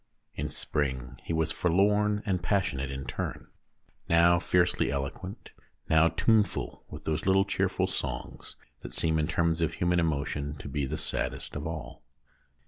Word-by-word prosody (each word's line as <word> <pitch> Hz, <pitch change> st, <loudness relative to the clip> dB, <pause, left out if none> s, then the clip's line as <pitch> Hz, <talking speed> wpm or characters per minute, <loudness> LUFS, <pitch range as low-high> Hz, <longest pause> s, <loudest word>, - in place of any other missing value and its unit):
In -, -, -3 dB
spring 65 Hz, -4 st, -2 dB
he -, -, -5 dB
was 80 Hz, 0 st, +1 dB
forlorn 105 Hz, +4 st, +2 dB
and 95 Hz, -3 st, 0 dB
passionate 85 Hz, -8 st, 0 dB
in 70 Hz, 0 st, -5 dB
turn; 65 Hz, -, -4 dB, 0.6 s
now 85 Hz, +1 st, +6 dB
fiercely 90 Hz, 0 st, +2 dB
eloquent, 70 Hz, +7 st, -5 dB, 0.4 s
now 80 Hz, +1 st, +6 dB
tuneful 105 Hz, +4 st, +1 dB
with 75 Hz, 0 st, -9 dB
those 80 Hz, +3 st, -2 dB
little 95 Hz, 0 st, +5 dB
cheerful -, -, +1 dB
songs 65 Hz, -1 st, -4 dB, 0.3 s
that -, -, -8 dB
seem 80 Hz, -1 st, +1 dB
in 75 Hz, -, +1 dB
terms 85 Hz, -1 st, +1 dB
of 80 Hz, 0 st, 0 dB
human 90 Hz, 0 st, +2 dB
emotion 75 Hz, -2 st, -1 dB
to 70 Hz, -, -9 dB
be 70 Hz, 0 st, -1 dB
the 75 Hz, +3 st, -3 dB
saddest 75 Hz, -, -3 dB
of 75 Hz, +1 st, -3 dB
all. 80 Hz, -2 st, -6 dB
80 Hz, 150 wpm, -29 LUFS, 75-90 Hz, 0.6 s, now